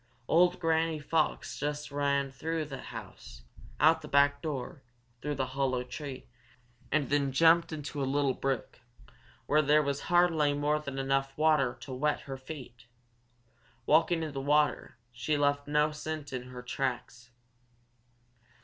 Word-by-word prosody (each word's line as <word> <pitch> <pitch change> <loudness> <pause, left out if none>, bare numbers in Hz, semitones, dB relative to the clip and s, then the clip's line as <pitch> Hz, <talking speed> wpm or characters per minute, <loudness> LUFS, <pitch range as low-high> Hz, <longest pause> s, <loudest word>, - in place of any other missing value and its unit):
Old 175 +2 +4
Granny 165 -1 +1
Fox 155 +1 -1
just 150 0 -3
ran 140 -1 0
through 160 +4 -3
the 140 -2 -7
house, - - -10 0.4
out - - +5
the - - -9
back 140 0 +3
door, 140 -3 -5 0.4
through 150 0 -2
the 135 -1 -1
hollow 130 -2 0
tree, 135 +1 -7 0.7
and 145 -3 +1
then 140 -2 +2
jumped 165 +4 +4
into 145 -2 -5
a - - +1
little 140 0 +1
brook 135 -1 -3 0.7
where 150 +1 +3
there 150 +1 +4
was 140 0 -1
hardly 170 -4 +4
more 150 +1 +1
than 140 -3 -6
enough 135 0 -1
water 150 -5 +3
to 140 -4 -7
wet 150 +4 0
her 140 -2 -7
feet. 130 -4 -10 1.0
Walking 165 +3 +3
in 155 - -4
the 135 -1 -4
water, 145 -3 +1 0.2
she 120 +5 -1
left 145 0 +1
no 150 +1 +2
scent 150 -1 -6
in 125 -1 -4
her 125 -1 -9
tracks. 125 -1 -4
145 Hz, 150 wpm, -30 LUFS, 135-155 Hz, 1.0 s, out